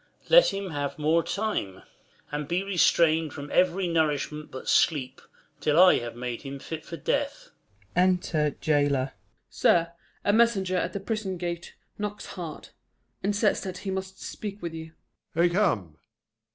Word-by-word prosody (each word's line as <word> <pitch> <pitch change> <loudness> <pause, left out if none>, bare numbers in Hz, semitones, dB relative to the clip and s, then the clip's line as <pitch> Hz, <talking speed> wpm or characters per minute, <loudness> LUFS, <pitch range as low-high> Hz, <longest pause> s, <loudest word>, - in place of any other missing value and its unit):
Let - - +8
him 195 -2 -4
have 145 -2 -3
more 155 +2 +3
time, 195 - -3 0.5
And 145 -1 -3
be 175 +4 0
restrain'd 165 -4 +3
from 145 +1 -7
ev'ry 185 +1 +2
nourishment 150 -2 0
but 130 - -9
sleep 135 -5 +2 0.4
Till 150 +1 +2
I 185 0 +7
have 120 -1 -6
made 120 -1 -4
him 140 0 -6
fit 155 +3 -7
for 170 - -7
death. - - -2 0.5
Unter 180 -4 +2
Jailor. 145 -3 +2
Jail. - - -28 0.4
Sir, 170 0 +3 0.3
a 205 - +3
messenger 205 -5 +3
at 180 0 -1
the 200 - -3
prison 195 -2 -3
gate 175 0 -5 0.2
Knocks 205 0 -4
hard, 170 -5 -7 0.5
and 200 +1 0
says 210 +1 +2
that 185 -1 -5
he 195 - -1
must 190 0 -5
speak 205 -1 -6
with 170 -3 -5
you. 160 0 -8 0.4
Prov. 170 +1 +4
I - - +4
come 100 - 0
170 Hz, 160 wpm, -27 LUFS, 150-190 Hz, 0.5 s, Let